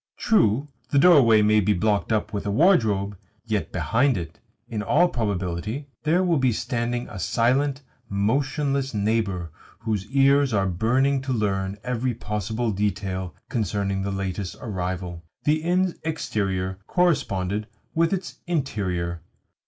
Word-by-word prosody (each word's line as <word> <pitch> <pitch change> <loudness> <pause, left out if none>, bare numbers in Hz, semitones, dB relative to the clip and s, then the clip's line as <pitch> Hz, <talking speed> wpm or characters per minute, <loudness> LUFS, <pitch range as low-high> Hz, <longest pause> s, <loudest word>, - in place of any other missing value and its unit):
True, 135 - +2 0.2
the 140 - +1
doorway 135 -9 +6
may 105 +1 +4
be 105 +1 +2
blocked 105 +3 0
up 110 -1 0
with 100 0 -3
a - - 0
wardrobe; 105 - +3 0.3
yet 110 -3 -2
behind 115 - +2
it, 85 -2 -7 0.3
in 110 -3 -3
all 150 +11 +4
probability, 105 - -3
there 165 +4 +2
will 170 -5 +2
be 130 -1 +3
standing 120 +1 -2
a 95 - -8
silent, 135 +8 +1 0.3
motionless 135 +5 0
neighbour 100 -5 0 0.3
whose 110 -4 -2
ears 140 -2 +3
are 100 -1 +2
burning 125 +9 +1
to 135 0 -4
learn 100 -4 -1
every 125 -1 -1
possible 110 +1 -2
detail 95 -2 -2
concerning 100 -5 -1
the 100 - -2
latest 95 -1 -3
arrival. 90 -5 -4 0.2
The 155 +1 +2
inn's 180 +2 +1
exterior 95 -12 -2
corresponded 105 - +1 0.3
with 165 0 +2
its 185 -3 -4
interior. 90 - -2
110 Hz, 135 wpm, -24 LUFS, 100-135 Hz, 0.3 s, doorway